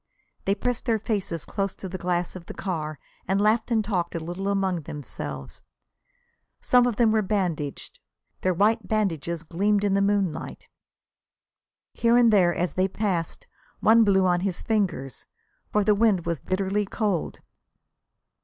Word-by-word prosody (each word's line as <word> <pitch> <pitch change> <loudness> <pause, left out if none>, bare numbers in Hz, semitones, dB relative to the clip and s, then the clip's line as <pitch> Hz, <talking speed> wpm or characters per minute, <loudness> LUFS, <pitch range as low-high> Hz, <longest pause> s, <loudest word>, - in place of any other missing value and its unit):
They 195 - +2
pressed 245 +3 -2
their 230 -3 +2
faces 200 -7 -3
close 195 -1 -2
to 190 - -7
the 185 0 -6
glass 175 0 -1
of 175 -2 -9
the - - -8
car 155 -5 -3 0.3
and 195 +2 +1
laughed 215 +3 +2
and 220 -3 +1
talked 180 -5 -1
a - - -1
little 175 +4 -5
among 190 -3 0
themselves. 75 - -7 1.0
Some 245 -1 +4
of 240 - -1
them 230 0 +4
were 220 0 +3
bandaged. 180 -8 -2 0.4
Their 185 -1 +1
white 210 +2 +2
bandages 170 -6 -1
gleamed 200 +5 +1
in 200 -1 +2
the 200 - +3
moonlight. 200 -5 -1 1.3
Here 235 0 +3
and 235 -2 +5
there, 180 -4 +5
as 175 +1 -1
they 185 +1 +2
passed, 195 - -2 0.3
one 225 +1 +6
blew 190 -3 +4
on 175 -1 +3
his 185 -1 -2
fingers, 190 - -1 0.4
for 210 - +2
the 210 - +4
wind 205 -4 +2
was 170 -3 -1
bitterly 195 +4 -1
cold. 200 -6 -2
195 Hz, 155 wpm, -25 LUFS, 175-210 Hz, 1.3 s, one